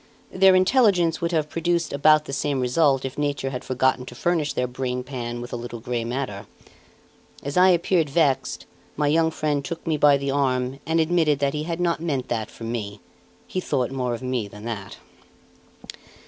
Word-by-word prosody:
Their 190 Hz, 0 st, +5 dB
intelligence 185 Hz, -4 st, +3 dB
would 170 Hz, 0 st, 0 dB
have 155 Hz, -3 st, 0 dB
produced 170 Hz, +2 st, -1 dB
about 150 Hz, +2 st, +4 dB
the 135 Hz, -, -7 dB
same 140 Hz, 0 st, -1 dB
result 135 Hz, +1 st, +2 dB
if 135 Hz, +2 st, -5 dB
nature 145 Hz, -2 st, -1 dB
had 125 Hz, 0 st, -5 dB
forgotten 130 Hz, 0 st, +1 dB
to 120 Hz, -, -9 dB
furnish 160 Hz, 0 st, 0 dB
their 125 Hz, -, 0 dB
brain 125 Hz, 0 st, -3 dB
pan 120 Hz, -2 st, -5 dB
with 120 Hz, -, -8 dB
a -, -, -1 dB
little 120 Hz, 0 st, -6 dB
grey 120 Hz, 0 st, -3 dB
matter. 120 Hz, -4 st, -4 dB, 1.0 s
As 140 Hz, +1 st, -4 dB
I 185 Hz, +1 st, +6 dB
appeared 170 Hz, -3 st, +2 dB
vexed, 135 Hz, -4 st, +1 dB, 0.3 s
my 150 Hz, -, +1 dB
young 160 Hz, +2 st, +3 dB
friend 150 Hz, -3 st, -1 dB
took 170 Hz, +3 st, -6 dB
me 160 Hz, -2 st, 0 dB
by 145 Hz, -1 st, +5 dB
the 140 Hz, 0 st, -2 dB
arm 130 Hz, -1 st, 0 dB
and 165 Hz, +1 st, +2 dB
admitted 160 Hz, -2 st, +2 dB
that 140 Hz, 0 st, 0 dB
he 150 Hz, 0 st, -3 dB
had 170 Hz, 0 st, -3 dB
not 170 Hz, -2 st, 0 dB
meant 140 Hz, -6 st, -2 dB
that 110 Hz, -2 st, -2 dB
for -, -, -12 dB
me; 110 Hz, -3 st, -4 dB, 0.5 s
he 185 Hz, -, -3 dB
thought 130 Hz, -8 st, -1 dB
more 125 Hz, -3 st, -1 dB
of 120 Hz, -, -9 dB
me 125 Hz, -4 st, -2 dB
than 105 Hz, +2 st, -11 dB
that. 110 Hz, -4 st, -6 dB
140 Hz, 190 wpm, -24 LUFS, 125-165 Hz, 1.0 s, I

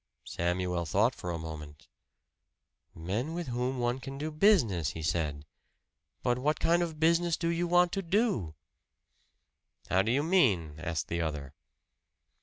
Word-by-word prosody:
Samuel 90 Hz, 0 st, -1 dB
thought 110 Hz, +9 st, +3 dB
for 90 Hz, -, -7 dB
a 85 Hz, -, -2 dB
moment. 75 Hz, -3 st, -8 dB, 1.1 s
"Men 105 Hz, -, -3 dB
with 170 Hz, -5 st, -4 dB
whom 125 Hz, +2 st, -1 dB
one 120 Hz, +1 st, 0 dB
can 135 Hz, +1 st, -7 dB
do 155 Hz, +2 st, -3 dB
business," 150 Hz, -, +3 dB
he 80 Hz, -, -6 dB
said 75 Hz, -3 st, -1 dB, 0.8 s
"but 125 Hz, 0 st, +1 dB
what 150 Hz, +4 st, 0 dB
kind 170 Hz, +1 st, +3 dB
of 160 Hz, -3 st, -3 dB
business 170 Hz, +1 st, +3 dB
do 170 Hz, -, -1 dB
you 170 Hz, +1 st, 0 dB
want 175 Hz, 0 st, +4 dB
to 195 Hz, -, -1 dB
do?" 170 Hz, -, 0 dB, 1.4 s
"How 95 Hz, -, +4 dB
do 110 Hz, +4 st, 0 dB
you 140 Hz, +4 st, +2 dB
mean?" 115 Hz, -, +2 dB
asked 80 Hz, -2 st, -3 dB
the 85 Hz, 0 st, -2 dB
other. 75 Hz, -4 st, -4 dB
120 Hz, 150 wpm, -30 LUFS, -, 1.4 s, want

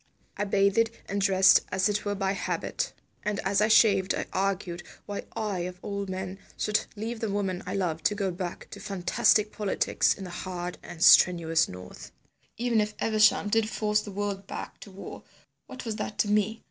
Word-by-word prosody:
I 205 Hz, -, -1 dB
bathed 200 Hz, +3 st, +3 dB, 0.2 s
and 200 Hz, 0 st, -2 dB
dressed 190 Hz, -1 st, +6 dB
as 190 Hz, +1 st, +2 dB
it 210 Hz, 0 st, -1 dB
were 205 Hz, 0 st, -1 dB
by 195 Hz, -1 st, 0 dB
habit, 200 Hz, -, -2 dB, 0.3 s
and 210 Hz, -1 st, -2 dB
as 195 Hz, +1 st, +1 dB
I 215 Hz, -, +4 dB
shaved 200 Hz, -4 st, +4 dB
I -, -, -3 dB
argued 185 Hz, -2 st, -1 dB, 0.2 s
why 205 Hz, -1 st, -5 dB
I 210 Hz, -4 st, -2 dB
of 180 Hz, +1 st, -4 dB
all 200 Hz, -1 st, -4 dB
men 190 Hz, 0 st, -5 dB, 0.2 s
should 210 Hz, -1 st, 0 dB
leave 225 Hz, +2 st, -4 dB
the 220 Hz, -, -2 dB
woman 195 Hz, -3 st, -2 dB
I -, -, -3 dB
loved 165 Hz, -5 st, -2 dB
to 210 Hz, -, +3 dB
go 200 Hz, -2 st, -1 dB
back 175 Hz, 0 st, -6 dB
to 200 Hz, -, -8 dB
fantastic 205 Hz, +3 st, +2 dB
politics 205 Hz, -2 st, +1 dB
in 195 Hz, -, -9 dB
the 180 Hz, -, -7 dB
hard 180 Hz, 0 st, -5 dB
and 165 Hz, -, -6 dB
strenuous 165 Hz, -2 st, +6 dB
north. 90 Hz, 0 st, -10 dB, 0.5 s
Even 235 Hz, -1 st, +2 dB
if 210 Hz, 0 st, -3 dB
Evesham 215 Hz, -1 st, +3 dB
did 220 Hz, 0 st, +2 dB
force 210 Hz, -1 st, 0 dB
the 210 Hz, -, -9 dB
world 200 Hz, -1 st, -4 dB
back -, -, -7 dB
to -, -, -11 dB
war, 190 Hz, -, -9 dB, 0.5 s
what 255 Hz, -, -9 dB
was 220 Hz, -2 st, -3 dB
that 210 Hz, -1 st, -5 dB
to -, -, +2 dB
me? 210 Hz, +2 st, +1 dB
200 Hz, 190 wpm, -27 LUFS, 190-210 Hz, 0.5 s, dressed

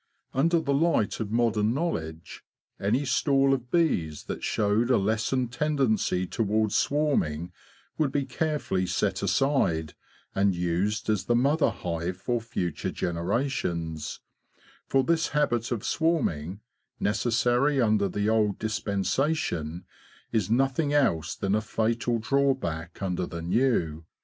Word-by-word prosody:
Under 165 Hz, +5 st, +3 dB
the 145 Hz, -3 st, -1 dB
light 145 Hz, -7 st, +1 dB
of 110 Hz, -3 st, -3 dB
modern 115 Hz, -1 st, +1 dB
knowledge, 80 Hz, -, -4 dB, 0.4 s
any 120 Hz, +8 st, +1 dB
stall 135 Hz, 0 st, +3 dB
of 125 Hz, -2 st, -3 dB
bees 90 Hz, -, +1 dB
that -, -, -6 dB
Showed 105 Hz, +4 st, +1 dB
a 125 Hz, -, +5 dB
lessened 115 Hz, +5 st, 0 dB
tendency 120 Hz, -10 st, +1 dB
towards 110 Hz, +1 st, 0 dB
swarming 90 Hz, -, +1 dB, 0.5 s
would 150 Hz, -4 st, +2 dB
be 140 Hz, -1 st, 0 dB
carefully 150 Hz, -, -1 dB
set -, -, 0 dB
aside, 85 Hz, -, +1 dB, 0.4 s
and 95 Hz, -1 st, +2 dB
used 90 Hz, +5 st, -1 dB
as 105 Hz, -3 st, 0 dB
the 120 Hz, -, +2 dB
mother 140 Hz, +6 st, +3 dB
hive 85 Hz, +1 st, -4 dB
for 120 Hz, +4 st, -1 dB
future 90 Hz, -7 st, -3 dB
generations; 85 Hz, -, -2 dB, 0.7 s
for 135 Hz, -1 st, +3 dB
this 165 Hz, +3 st, +1 dB
habit 120 Hz, -6 st, +1 dB
of 115 Hz, -4 st, -2 dB
swarming, 100 Hz, -, 0 dB, 0.4 s
necessary 120 Hz, +6 st, +2 dB
under 105 Hz, -4 st, +2 dB
the 105 Hz, +3 st, -1 dB
old 110 Hz, -2 st, +2 dB
dispensation, 100 Hz, -, -1 dB, 0.5 s
is 110 Hz, -5 st, 0 dB
nothing 135 Hz, +5 st, +1 dB
else 110 Hz, -, +1 dB
than 100 Hz, 0 st, -1 dB
a 110 Hz, -, +2 dB
fatal 115 Hz, +2 st, 0 dB
drawback 115 Hz, -10 st, -1 dB
under 90 Hz, -1 st, -1 dB
the 85 Hz, -1 st, -6 dB
new. 85 Hz, -, +1 dB
110 Hz, 125 wpm, -27 LUFS, 90-135 Hz, 0.7 s, a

